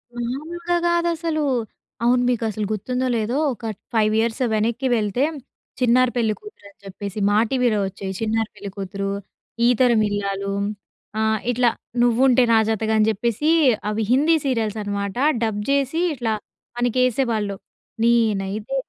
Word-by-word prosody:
మామూలుగా 315 +9 -3
కాదసలు. 335 -2 0 0.6
అవును. 245 +1 +4
మీకు 240 -2 0
అసలు 210 0 -3
గుర్తుందో 250 +5 -1
లేదో 225 +5 -1 0.2
ఒక 230 - -10 0.3
5 215 -1 +3
ఇయర్స్ 225 +2 -1
వెనక్కి 235 +4 0
వెళ్తే 215 +4 0 0.6
'చిన్నారి 250 0 +4
పెళ్ళికూతురు' 225 - -3
అని 200 - -25
చెప్పేసి. 200 +1 -6
మా 205 - +3
టీవీలో 245 -5 +2
వచ్చేవి 190 0 -6
'చిన్నారి 225 0 0
పెళ్ళికూతురు', 195 0 -5 0.5
'ఈతరం 240 -2 +4
ఇల్లాలు' 200 -1 -2 0.7
ఆహ్, 220 0 +1
ఇట్లా 245 0 +3 0.3
'నువ్వుంటే 245 +1 +4
నాజాతగా' 220 0 +2
అని 215 0 +3
చెప్పేసి 235 +8 0 0.4
అవి 215 +1 -1
హిందీ 300 +6 +4
సీరియల్స్ 225 -5 0
అన్నమాట 200 +1 -3 0.3
డబ్ 210 -2 -1
చేసి 280 +3 +1
ఇట్లా 230 -5 -1 0.4
మనకేసేవాళ్ళు. 240 -4 +1 0.5
నేనైతే 220 -1 +1
225 Hz, 120 wpm, -22 LUFS, 210-255 Hz, 0.7 s, అవును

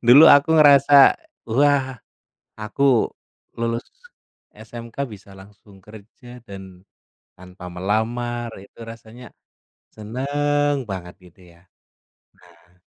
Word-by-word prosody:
dulu 135 +6 +8
aku 145 +2 +5
ngerasa, 140 -2 +6 0.4
"Wah! 135 0 +1 0.6
aku 120 +3 0 0.5
lulus 115 0 -3 0.7
SMK, 115 +2 -12
bisa 100 -2 -14
langsung 100 +1 -18
kerja 110 +4 -15
dan 95 -3 -12 0.6
tanpa 90 0 -13
melamar." 115 +6 -3
Itu 100 +4 -15
rasanya 115 +1 -13 0.6
seneng 145 +5 -2
banget 90 -2 -7 0.2
gitu 95 - -24 0.2
ya. 85 - -27 1.0
Nah 90 +1 -31
115 Hz, 95 wpm, -21 LUFS, 100-135 Hz, 1.0 s, dulu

